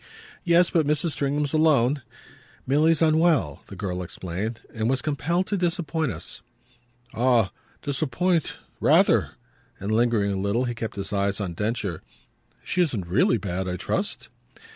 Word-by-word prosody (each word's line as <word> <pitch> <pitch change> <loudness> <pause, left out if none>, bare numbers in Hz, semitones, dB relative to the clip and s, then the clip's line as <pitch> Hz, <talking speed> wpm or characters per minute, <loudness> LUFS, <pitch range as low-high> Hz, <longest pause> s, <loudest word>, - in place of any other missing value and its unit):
"Yes, 170 0 +4
but 160 -4 +2
Mrs. 150 +2 +1
Stringham's 145 0 -1
alone. 145 -3 +3 0.6
Milly's 155 +4 +3
unwell," 155 - +2
the - - -9
girl 90 -3 -3
explained, 95 +6 -5
"and 110 0 -1
was 130 0 +2
compelled 160 +5 0
to 200 - -1
disappoint 165 -4 -1
us." 85 -1 -6 0.7
"Ah 120 -4 +3 0.3
'disappoint' 155 +4 0 0.2
rather!" - - +4 0.5
And, 100 +2 -3
lingering 110 -3 +2
a - - -1
little, 100 +5 0
he 120 - -2
kept 115 -1 -5
his 100 0 -4
eyes 100 0 0
on 95 -4 -3
Densher. 105 -3 -2 0.6
"She 180 - 0
isn't 120 - 0
really 95 +6 +3
bad, 95 -2 -3
I 90 0 -2
trust?" - - -2
120 Hz, 140 wpm, -25 LUFS, 100-155 Hz, 0.7 s, Yes